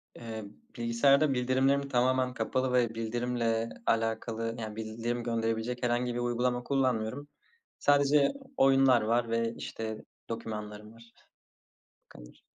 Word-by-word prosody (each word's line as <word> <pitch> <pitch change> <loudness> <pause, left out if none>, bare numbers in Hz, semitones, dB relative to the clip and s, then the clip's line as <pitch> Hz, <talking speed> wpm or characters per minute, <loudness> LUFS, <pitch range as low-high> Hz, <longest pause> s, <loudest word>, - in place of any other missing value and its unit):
Eee, 110 -2 -7 0.3
bilgisayarda 135 +5 +3
bildirimlerim 130 +2 +1
tamamen 130 0 +2
kapalı 130 0 -1
ve 120 -2 +2
bildirimle 115 0 -1 0.2
alakalı, 115 0 -1
yani, 110 -2 -5
bildirim 115 +2 -3
gönderebilecek 115 +1 -2
herhangi 120 0 0
bir 120 - -3
uygulama 120 +1 0
kullanmıyorum. 130 0 -1 0.5
Sadece 145 - +4 0.2
oyunlar 135 -2 +5
var 115 +2 +1
ve, 115 0 0
işte, 110 -1 -5 0.3
dokümanlarım 105 -1 -6
var. 115 0 -17 0.9
Bu - - -61
kadar. - - -15
120 Hz, 115 wpm, -30 LUFS, 115-130 Hz, 0.9 s, oyunlar